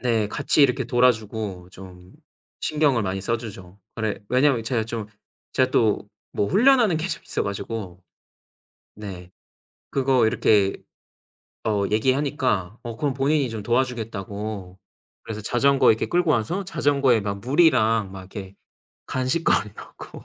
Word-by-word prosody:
네 115 -4 +1
같이 150 - +2
이렇게 130 -1 +3
돌아 125 +1 +4
주고 105 -5 -6
좀 90 -1 -13 0.5
신경을 145 -7 +1
많이 95 0 -2
써 115 +4 0
주죠. 95 -4 -10 0.2
아래 110 -2 -2
왜냐면 130 -1 +3
제가 115 -2 0
좀 115 -2 -5 0.5
제가 130 0 +2
또 110 -5 +1 0.3
뭐 100 - +1
훈련하는 230 - +4
게 160 +4 -2
좀 - - -4
있어 - - -2
가지고 100 -2 -5 0.9
네 95 -4 -9 0.6
그거 130 -4 +3
이렇게 100 -3 +3 0.9
어 105 -2 +1
얘기하니까 125 -4 0
어 115 -2 -6
그럼 145 -3 -1
본인이 140 0 +1
좀 110 -2 -5
도와주겠다고 110 -5 -3 0.4
그래서 110 -1 -6
자전거 135 +5 +3
이렇게 110 - +1
끌고 175 -2 +1
와서 155 - 0
자전거에 140 - +2
막 100 -1 -4
물이랑 115 - +3
막 95 - -8
이렇게 95 +1 -9 0.5
간식거리 130 -4 0
넣고 - - -11
115 Hz, 290 characters per minute, -23 LUFS, 100-135 Hz, 0.9 s, 돌아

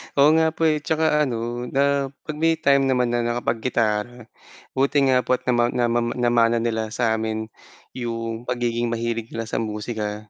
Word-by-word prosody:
Oo 140 +1 +6
nga 160 0 +4
po - - -2
eh, 155 -1 +1
tsaka 155 0 +1
ano 120 0 -3
na 140 +1 +1 0.2
'pag 155 - -6
may 165 0 +3
time 140 -3 +3
naman 125 -2 +1
na 120 - +1
nakapag-gitara 120 -1 -1 0.5
buti 140 +2 +2
nga 130 -1 +4
po 130 - +3
at 125 - -10
nama 120 -2 +2
namama 120 -1 0
namana 120 -1 +3
nila 110 -1 -1
sa 115 -2 +1
'min 110 0 -3 0.5
'yong 115 -1 -4
pagiging 120 -1 -1
mahilig 115 -1 -2
nila 115 - -3
sa - - -2
musika. 105 -1 -4
120 Hz, 170 wpm, -23 LUFS, 115-130 Hz, 0.5 s, Oo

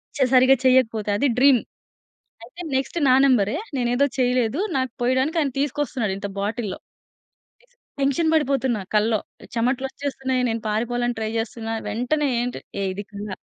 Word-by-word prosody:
ప - - -6
చె 265 - +4
సరిగ్గా 260 +1 +6
చేయకపోతే 240 -5 +3
అది 285 - +2
డ్రీమ్ 270 -1 +6 0.9
అయితే 340 +10 -10
నెక్స్ట్ 265 +5 -1
నా 255 - +6
నంబరె 235 -5 +3 0.2
నేనేదో 245 +2 +2
చేయలేదు. 250 0 +1 0.2
నాకు 260 -1 0
పోయడానికి 260 +6 +1
ఆయన 280 -4 0
తీసుకొస్తున్నాడు 275 -7 -1
ఇంత 200 - -4
బాటిల్‌లో. 205 -1 -3 0.8
తీస్ - - -30 0.3
టెన్షన్ 280 +4 +2
పడిపోతున్న 270 -6 +1 0.2
కల్లో. 215 0 +2 0.4
చమటలొచ్చేస్తున్నాయి. 260 +1 -1
నేను 225 0 -2
పారిపోవాలని 240 +2 -1
ట్రై 220 0 -2
చేస్తున్న. 225 0 -4 0.2
వెంటనే 280 +6 0
ఏంటి, 245 0 -3 0.2
ఏ - - 0
ఇది 205 +2 -6
కల 205 +1 -6
250 Hz, 145 wpm, -23 LUFS, 225-270 Hz, 0.9 s, సరిగ్గా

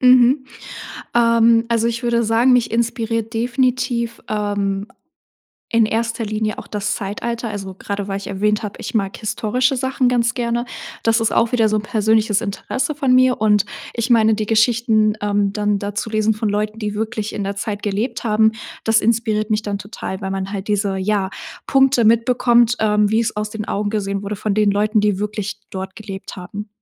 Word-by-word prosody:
Mhm. 255 +2 +5 0.7
Ähm, 230 -1 +4
also, 230 -1 +1
ich 235 +1 -2
würde 235 -1 +1
sagen, 230 +4 +3
mich 245 -2 +3
inspiriert 230 -1 -1
definitiv, 240 0 0
ähm, 205 -1 -1 0.8
in 230 -1 +4
erster 230 +1 -1
Linie 215 0 -2
auch - - -8
das 205 -1 -2
Zeitalter, 230 +4 -4
also, 195 -2 -6
gerade 200 +1 -4
weil 195 - -2
ich 200 - -9
erwähnt 210 +3 0
habe, 210 -1 -5
ich - - -6
mag 195 -3 0
historische 235 +5 0
Sachen 260 0 +1
ganz 235 -2 +1
gerne. 240 0 -1 0.4
Das 225 0 +2
ist 225 - +1
auch 235 +1 +2
wieder 225 -3 +3
so 215 - +2
'n 210 - -1
persönliches 215 0 +2
Interesse 235 +7 -3
von 275 -4 +2
mir, 255 -2 +4
und 210 -2 +3 0.3
ich 235 +2 -2
meine, 220 -2 +5
die 215 - -2
Geschichten, 220 -1 +3
ähm, 205 -1 +1
dann 210 -1 +1
da 205 0 -5
zu 215 +2 -3
lesen 215 0 +2
von 215 0 -2
Leuten, 210 +1 -2
die 210 -2 -3
wirklich 215 0 -3
in 205 - -3
der 200 0 -3
Zeit 205 0 -4
gelebt 220 +4 -2
haben, 220 0 +3 0.3
das 225 0 +4
inspiriert 220 -1 +1
mich 215 0 +1
dann 205 -2 -3
total, 200 -1 -6
weil 190 - -3
man 195 +1 -3
halt 200 0 -5
diese, 200 -2 0
ja, 195 0 0 0.4
Punkte 270 -3 +4
mitbekommt, 235 +1 +4
ähm, 210 -1 +3
wie 220 +1 +3
es 225 -1 -1
aus 210 0 -2
den 215 -1 -5
Augen 205 +1 -1
gesehen 200 -2 -2
wurde 205 +1 -4
von 210 0 -1
den 210 -1 +3
Leuten, 210 +2 +2
die 205 -2 +1
wirklich 210 -1 -4
dort 190 0 -6
gelebt 200 -3 -8
haben. 200 +3 -7
215 Hz, 190 wpm, -19 LUFS, 205-235 Hz, 0.8 s, Mhm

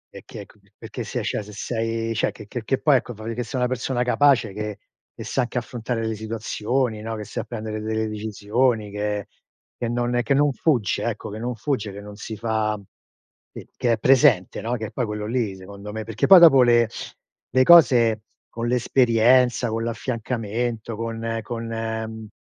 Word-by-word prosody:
È - - -8
che - - -9
ecco - - -16 0.2
perché - - -7
se - - -4
cioè - - -2
se 105 - -11
sei 115 +1 -2
cioè 115 - 0
che 110 - -12
che 115 +3 -6
che 135 +5 0
poi 145 -3 +4
ecco 120 - -5
che - - -17
fai 110 - -9
vedere 115 +1 -3
che 120 - -6
sei 130 - -2
una 125 - +2
persona 125 0 -1
capace 125 -4 +3
che 105 0 -5 0.3
che - - -9
sa 135 - -1
anche 125 0 -3
affrontare 120 -1 -3
le 110 - -1
situazioni, 110 +2 -2
no, 115 +1 -4
che 105 - -6
sa 105 - -5
prendere 110 -2 -5
delle 110 0 -1
decisioni, 110 +1 -1
che 105 0 -2 0.5
che 120 - -3
non, 120 +1 -1
ehm, 120 - +2
che 125 +4 +1
non 145 +1 +3
fugge, 125 - +1
ecco, - - -4
che 105 - -6
non 120 +2 -3
fugge, 115 -3 -2
che 100 - -9
non 105 0 -10
si 110 +1 -7
fa 110 -1 -1 0.7
che - - -11
che 120 -1 +1
è - - 0
presente, 120 -6 +3
no, 115 +2 -2
che 110 - -5
è - - -12
poi 125 - -2
quello 105 0 -4
lì 110 -3 -1
secondo 100 +2 -10
me 110 +1 -5
perché 110 0 -1
poi 190 -2 +10
dopo 160 -6 +8
le 120 -1 +5 0.6
le 130 0 +4
cose 120 -9 +6 0.3
con 115 0 -4
l'esperienza, 125 0 +3
con 115 +1 -2
l'affiancamento, 115 -1 -3
con 115 0 -3
con, 115 +1 -5
mhmm, 110 -1 -4
115 Hz, 200 wpm, -23 LUFS, 110-125 Hz, 0.7 s, poi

